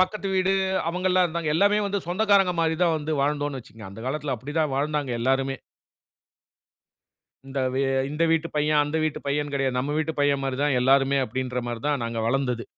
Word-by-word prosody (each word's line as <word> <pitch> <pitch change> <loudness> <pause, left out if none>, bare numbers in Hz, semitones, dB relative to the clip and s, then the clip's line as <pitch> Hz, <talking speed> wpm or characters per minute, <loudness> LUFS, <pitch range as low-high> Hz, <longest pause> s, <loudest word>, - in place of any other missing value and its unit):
பக்கத்து 195 +2 0
வீடு 190 0 +2 0.4
அவங்கலாம் 180 +1 +2
இருந்தாங்க 165 -2 -3
எல்லாமே 205 +5 +3
வந்து 200 0 -1
சொந்தக்காரங்க 195 -1 +3
மாரி 160 0 +1
தான் 165 -2 +2
வந்து 155 +1 -3
வாழ்ந்தோம்னு 145 -1 -1
வச்சுக்கோங்க. 110 -4 -12
அந்த 100 - -10
காலத்துல 140 0 -2
அப்டித்தான் 150 +4 -2
வாழ்ந்தாங்க 145 -2 -1
எல்லாருமே 135 +2 +1 1.9
இந்த 135 +1 -4 0.2
வே 135 - +1 0.5
வீட்டு 165 0 0
பையன், 150 0 +3
அந்த 145 +2 -3
வீட்டு 155 - -2
பையன், 145 +1 -1
கெடையாது 135 -2 0
நம்ம 140 +3 -1
வீட்டு 155 0 -1
பையன், 145 -1 +2
மாரி 135 -1 -2
தான் 145 -3 +2
எல்லாருமே 135 +2 +3
அப்டின்ற 125 +1 -3
மாரி 120 -1 -4
தான் 145 -4 0
நாங்க 115 0 -3
வளர்ந்தது. 125 -1 0
145 Hz, 170 wpm, -25 LUFS, 135-165 Hz, 1.9 s, எல்லாமே